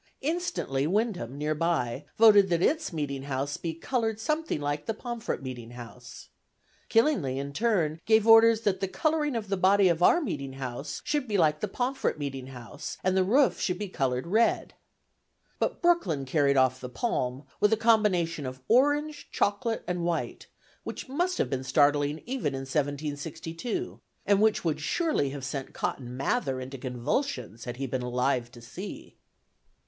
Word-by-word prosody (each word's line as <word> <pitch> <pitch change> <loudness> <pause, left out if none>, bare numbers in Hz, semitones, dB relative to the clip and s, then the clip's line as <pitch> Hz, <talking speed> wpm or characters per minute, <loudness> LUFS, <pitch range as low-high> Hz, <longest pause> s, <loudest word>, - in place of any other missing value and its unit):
Instantly 190 - -1
Windham, 185 - -1
near 150 +1 0
by, 150 -5 -1
voted 205 -3 +7
that 170 0 +1
its 315 -3 +1
meeting 145 -4 -3
house 140 +1 -3
be 165 -2 -4
"colored 225 +4 -1
something 305 - -1
like 145 0 -3
the 225 - -1
Pomfret 235 - -4
meeting 125 -3 -7
house." 120 0 -11 0.6
Killingly, 225 - +2
in 140 +1 -4
turn, 170 -7 0
gave 220 -1 +5
orders 225 0 +7
that 205 -4 0
"the 195 - -1
cullering 295 - 0
of 220 -3 -3
the 195 0 -1
body 190 +1 +5
of 170 0 0
our 345 - +6
meeting 140 - -4
house 135 +2 -5
should 295 -3 -1
be 210 -2 0
like 155 -3 +3
the - - -2
Pomfret 255 -5 -1
meeting 135 -3 -5
house, 125 +4 -8
and 185 0 +2
the 190 - +4
Roff 225 0 +3
shal 180 - -1
be 205 +1 -4
cullered 130 -6 -1
Read." 220 +7 +1 0.9
But - - -2
Brooklyn 185 - +2
carried 140 0 +2
off 130 0 +3
the 125 - -6
palm, 130 - -2 0.2
with 210 - +4
a 220 - +4
combination 185 - +2
of 130 0 -8
orange, 290 +4 +2
chocolate 225 +3 0
and 180 -1 -2
white, 170 -1 -2 0.4
which - - -7
must 355 +7 0
have - - 0
been 130 -1 -2
startling 145 +2 +2
even 245 - -2
in 135 - -4
1762, 150 - -3 0.2
and 200 0 +3
which 215 -4 +2
would 160 -2 0
surely 305 - 0
have 135 -1 -6
sent 135 0 -5
Cotton 125 -1 -3
Mather 135 - 0
into 130 +1 -7
convulsions, 125 - -3
had 120 -1 -5
he 135 - -3
been 130 0 -2
alive 125 0 0
to 120 - -12
see. 205 - -8
165 Hz, 170 wpm, -28 LUFS, 135-225 Hz, 0.9 s, voted